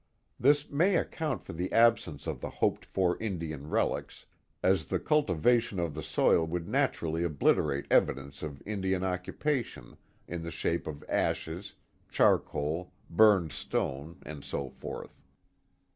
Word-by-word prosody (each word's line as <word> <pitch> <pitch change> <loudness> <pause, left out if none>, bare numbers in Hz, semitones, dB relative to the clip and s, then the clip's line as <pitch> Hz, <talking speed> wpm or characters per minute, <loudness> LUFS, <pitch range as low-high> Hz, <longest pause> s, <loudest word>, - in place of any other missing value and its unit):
This 145 +3 +4
may 175 +7 +3
account 155 - -1
for - - -8
the 90 +3 -3
absence 115 -11 +3
of 75 -6 -4
the - - -4
hoped - - 0
for 90 -2 0
Indian 80 -8 -4
relics, - - -1 0.4
as 95 -5 +3
the - - -1
cultivation 120 - +2
of 85 -3 -1
the - - -5
soil 80 - +3
would 85 0 -3
naturally 80 0 0
obliterate 70 -3 +1
evidence 70 +1 +2
of 75 -3 -6
Indian 95 -3 -1
oc 90 -1 -1
cupation, 145 -6 -3 0.3
in 85 0 -4
the 85 - -5
shape 85 +1 -2
of 75 -1 -6
ashes, 85 +5 -2 0.3
charcoal, 80 +5 +1 0.2
burned 95 -3 +5
stone, 70 +7 -3
and 75 -2 -8
so 70 -2 -4
forth. - - -8
85 Hz, 140 wpm, -30 LUFS, 75-105 Hz, 0.4 s, burned